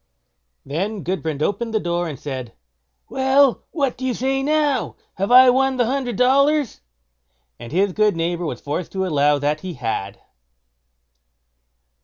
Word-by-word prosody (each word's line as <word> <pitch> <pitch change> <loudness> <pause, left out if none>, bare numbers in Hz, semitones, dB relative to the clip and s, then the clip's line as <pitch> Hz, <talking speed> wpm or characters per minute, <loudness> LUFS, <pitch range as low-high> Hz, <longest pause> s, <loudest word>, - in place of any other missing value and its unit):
Then 190 +8 -3
Gudbrand 160 -5 -3
opened 225 +4 -2
the - - +3
door 175 -1 -2
and 150 -4 -6
said; 130 -5 -6 0.5
"Well, 265 0 +2
what 280 -6 -2
do - - -7
you 255 -2 -1
say 270 +1 -1
now? 295 -1 0 0.2
Have 195 +4 -3
I 255 0 +8
won 265 +1 +1
the 245 - +2
hundred 250 -1 -2
dollars?" 275 +3 +2 0.8
and 120 - -9
his 190 +2 +1
neighbour 175 -4 +1
was 125 -5 -5
forced 150 +5 -4
to 190 -1 -1
allow 145 -3 +2
that 145 +2 -1
he 180 0 -7
had. 105 -5 -4
200 Hz, 145 wpm, -21 LUFS, 155-260 Hz, 0.8 s, I